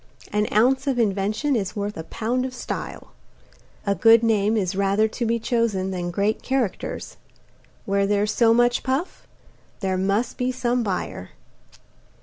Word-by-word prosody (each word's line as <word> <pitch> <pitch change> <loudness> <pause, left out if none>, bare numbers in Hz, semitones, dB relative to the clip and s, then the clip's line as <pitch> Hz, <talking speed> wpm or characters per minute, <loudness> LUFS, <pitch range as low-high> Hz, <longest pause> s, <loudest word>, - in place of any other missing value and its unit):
An 210 0 +1
ounce 260 +6 +3
of 265 -3 +1
invention 215 +6 0
is 200 -3 -2
worth 205 0 -3
a - - -5
pound 235 +8 -2
of 255 0 -5
style. - - -6 0.7
A 200 - +2
good 225 +2 +5
name 220 -1 +2
is 190 -3 -1
rather 200 +2 +2
to 230 +2 -3
be 230 +1 +1
chosen 225 -5 0
than 175 -1 -3
great 200 +5 0
characters. 260 -7 -3 0.7
Where 200 0 +1
there's 205 +1 +1
so 230 0 +4
much 240 +1 +3
puff, 270 +7 -3 0.5
there 190 -2 -1
must 200 +6 0
be 250 0 +1
some 245 -1 0
buyer. 185 - -3
215 Hz, 150 wpm, -23 LUFS, 200-240 Hz, 0.7 s, good